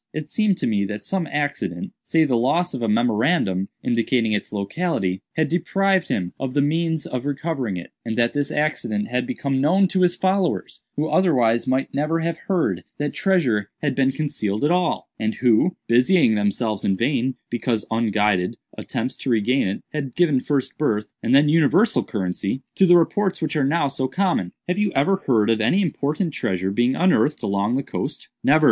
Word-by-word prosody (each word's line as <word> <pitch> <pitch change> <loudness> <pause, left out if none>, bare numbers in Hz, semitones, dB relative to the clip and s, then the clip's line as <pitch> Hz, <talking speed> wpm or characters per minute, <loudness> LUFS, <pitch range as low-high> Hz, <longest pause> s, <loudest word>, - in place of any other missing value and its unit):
It 155 0 -6
seemed 210 -4 +1
to - - -2
me 105 -3 +1
that 105 +1 -5
some 190 -4 -2
accident—say 145 - -1
the 130 -4 +1
loss 160 +9 +1
of 130 - -4
a 115 - 0
memorandum 110 - +1 0.2
indicating 115 -1 +1
its 105 - -2
locality—had 105 - -2
deprived 190 +2 +1
him 90 -2 -2
of 130 -1 -4
the 145 - +4
means 160 +1 0
of 125 -1 -4
recovering 140 - -2
it, 85 - -9
and 110 -1 -4
that 120 0 +2
this 145 0 -1
accident 125 -9 -1
had 125 0 -1
become 140 -5 -1
known 185 +7 +4
to 185 - 0
his 180 -1 +3
followers, 185 -1 -1
who 150 +2 -1
otherwise 125 -11 +2
might 130 +1 0
never 155 +4 0
have 165 0 -2
heard 185 -4 0
that 145 0 -2
treasure 130 - +1
had 145 - +1
been 135 -1 +2
concealed 110 -8 -2
at 150 - +3
all, 180 -2 0
and 110 0 -1
who, 125 +9 +2
busying 125 +2 +4
themselves 105 0 -1
in 95 - +1
vain, 130 +1 0 0.2
because 120 -2 -1
unguided 105 -5 +1 0.2
attempts, 130 - -3
to - - -4
regain 120 +1 +2
it, 95 - -4
had 140 -5 -4
given 160 -7 +3
first 135 0 -2
birth, 105 -8 -1
and 120 +3 +2
then 145 +2 +5
universal 165 +8 +3
currency, 100 +4 -3
to 190 - +4
the 175 0 +7
reports 190 +3 +1
which 160 - -2
are 150 - +2
now 145 +2 +1
so 130 -1 -1
common. 165 - 0 0.2
Have 180 +3 -1
you 210 -2 +1
ever 150 +8 +2
heard 115 - +2
of 110 0 +1
any 145 - +2
important 155 -1 -1
treasure 95 -7 -1
being 120 +5 +1
unearthed 165 -4 +2
along 100 +4 0
the 135 - -1
coast?" - - -5
"Never." 150 +3 +5
135 Hz, 185 wpm, -22 LUFS, 110-165 Hz, 0.2 s, the